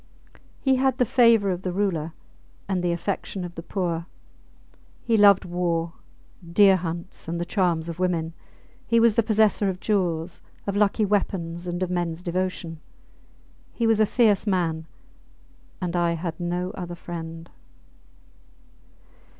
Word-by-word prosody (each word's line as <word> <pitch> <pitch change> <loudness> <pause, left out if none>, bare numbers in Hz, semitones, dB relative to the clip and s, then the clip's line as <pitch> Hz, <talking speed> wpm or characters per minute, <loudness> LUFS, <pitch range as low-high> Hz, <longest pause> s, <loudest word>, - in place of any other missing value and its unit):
He 265 -1 +2
had 260 -1 +2
the 250 - +3
favour 230 -5 +4
of 180 0 -3
the 185 - -2
Ruler 175 -5 -1 0.5
and 190 -2 0
the 175 - +1
affection 185 +1 -3
of 175 - -8
the 165 - -7
poor. 170 -2 -3 1.0
He 230 - +2
loved 200 -3 +6
war, 170 -2 -1 0.6
deer 195 +1 +6
hunts, 170 +1 -6
and 170 +1 -3
the 175 - -2
charms 175 -4 0
of 170 0 -6
women. 170 -3 0 0.5
He 230 0 +4
was 230 -1 +5
the 230 - +3
possessor 215 -2 +2
of 185 -1 -4
jewels, 175 -5 -1 0.2
of 200 - -2
lucky 210 +1 +2
weapons, 180 -4 -1
and 175 +1 -2
of 180 - -3
mens 175 -1 -2
devotion. 180 -2 -3 0.9
He 235 - -1
was 225 -1 +3
a 215 - +4
fierce 215 -2 +3
man; 165 -4 0 0.9
and 180 -2 -3
I 170 -1 +2
had 170 0 -4
no 175 +1 -2
other 175 -3 -6
friend. 165 -1 -8
180 Hz, 145 wpm, -25 LUFS, 170-205 Hz, 1.0 s, loved